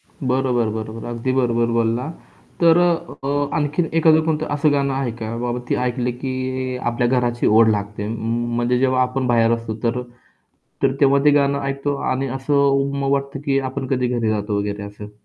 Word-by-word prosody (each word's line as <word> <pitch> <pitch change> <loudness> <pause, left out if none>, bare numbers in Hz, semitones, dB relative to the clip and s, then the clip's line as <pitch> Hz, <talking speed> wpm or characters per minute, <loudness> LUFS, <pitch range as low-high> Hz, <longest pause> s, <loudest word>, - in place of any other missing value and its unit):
बरोबर, 130 -3 -1
बरोबर, 110 +1 -6
अगदी 120 +2 -2
बरोबर 120 -3 +1
बोलला. 115 +4 0 0.5
तर 170 0 +6
अ, 170 -5 0 0.3
आणखीन 150 +3 0
एखादं 160 0 +5
कोणतं 160 -1 -1
असं 145 0 +2
गाणं 140 -1 +1
आहे 135 -2 -1
का, 110 +1 -4
बाबा 120 0 -2
ते - - +3
ऐकलं 125 0 -1
की 135 -1 -3 0.6
आपल्या 120 +1 0
घराची 120 -1 0
ओढ 110 +1 +5
लागते 105 0 -2
म 115 +1 -2
म्हणजे 120 +1 +1
जेव्हा 130 -1 +2
आपण 130 0 -1
बाहेर 115 -1 +3
असतो 115 -2 -3
तर 120 +1 0 0.8
तर 135 -1 +3
तेव्हा 140 -1 +5
ते 150 - +7
गाणं 140 -1 +2
ऐकतो 140 +1 -2 0.2
आणि 130 +1 -1
असं 135 +2 -2
उम्म, 140 0 +2
वाटतं 140 0 -2
की 135 -1 +2
आपण 135 0 -4
कधी 125 -1 0
घरी 115 - 0
जातो 105 -1 -1
वगैरे 100 0 -3
असं. 105 0 -9
130 Hz, 175 wpm, -21 LUFS, 115-140 Hz, 0.8 s, ते